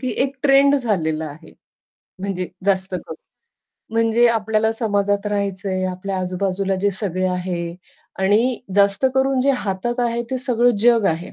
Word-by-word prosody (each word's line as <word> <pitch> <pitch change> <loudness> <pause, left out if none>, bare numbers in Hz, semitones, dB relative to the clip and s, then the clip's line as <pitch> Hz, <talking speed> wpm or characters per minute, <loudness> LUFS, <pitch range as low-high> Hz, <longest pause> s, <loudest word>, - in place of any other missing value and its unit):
की 255 -2 -2
एक 275 0 -2
ट्रेंड 280 0 +5
झालेला 160 - -1
आहे. 145 +2 -14 0.7
म्हणजे 185 -2 -3 0.2
जास्त 190 -1 +1
करून, 165 -2 -6 0.8
म्हणजे 230 +1 +3
आपल्याला 220 -1 +1
समाजात 205 -3 0
राहायचंय, 195 -2 -2
आपल्या 185 +1 -4
आजूबाजूला 190 +1 -1
जे 205 +1 +2
सगळे 185 -2 -2
आहे 175 -2 -3 0.4
आणि 215 +6 +2
जास्त 200 +5 +3
करून 265 0 +2
जे 275 +2 +3
हातात 230 +4 -2
आहे, 235 -1 0
ते 260 - -1
सगळं 245 -2 +2
जग 230 0 +4
आहे. 165 +2 -5
200 Hz, 145 wpm, -21 LUFS, 185-240 Hz, 0.8 s, ट्रेंड